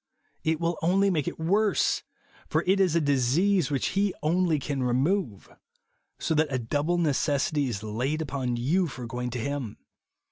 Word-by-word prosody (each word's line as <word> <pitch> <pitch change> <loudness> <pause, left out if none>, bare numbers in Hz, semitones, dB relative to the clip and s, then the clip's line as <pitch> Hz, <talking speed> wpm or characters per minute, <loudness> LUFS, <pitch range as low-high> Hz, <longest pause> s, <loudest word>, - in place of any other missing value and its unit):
It 160 0 0
will 170 0 -1
only 195 +4 +3
make 155 -6 -1
it - - -4
worse; 200 +6 +2 0.5
for - - +1
it 190 +2 +3
is 185 -4 +3
a - - +4
disease 150 +5 +2
which 140 -3 0
he 200 0 0
only 170 0 +2
can 140 -1 -3
remove. 130 - 0 0.7
So - - -1
that 155 0 +2
a 130 - 0
double 145 +8 -1
necessity 145 -2 +1
is 110 -4 -4
laid 125 +8 -2
upon 135 -5 -2
you 160 +10 +1
for 130 -5 -7
going 125 +1 -4
to 125 0 -4
Him. 135 -3 -4
150 Hz, 170 wpm, -27 LUFS, 130-175 Hz, 0.7 s, a